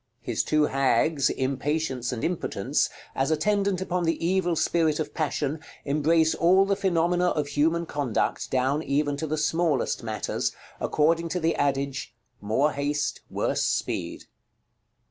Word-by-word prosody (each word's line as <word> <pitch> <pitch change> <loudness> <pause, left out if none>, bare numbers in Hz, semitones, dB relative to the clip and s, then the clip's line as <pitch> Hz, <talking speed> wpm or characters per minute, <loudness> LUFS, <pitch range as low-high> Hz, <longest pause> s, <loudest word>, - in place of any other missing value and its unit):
His - - -1
two 155 0 +2
hags, 135 +2 +2
Impatience 135 -1 -1
and 120 -3 -4
Impotence, 175 0 0 0.2
as 135 +2 0
attendant 195 +4 +1
upon 180 -1 -1
the 165 0 +1
evil 175 -1 +1
spirit 160 -1 +1
of 155 - -3
Passion, 150 -1 -1 0.3
embrace 155 +3 +3
all 185 +3 +4
the 200 0 +1
phenomena 180 -1 +1
of 150 -2 -1
human 165 +4 +1
conduct, 145 -7 -1
down 130 +3 +1
even 145 0 0
to 160 - -3
the 155 +1 -1
smallest 160 -2 0
matters, 110 - -2 0.3
according 165 +2 +1
to 180 - -1
the 165 0 +1
adage, 140 -3 -1 0.3
"More 110 +9 +1
haste, 145 +1 -2
worse - - -1
speed." - - -2
155 Hz, 140 wpm, -26 LUFS, 140-170 Hz, 0.3 s, all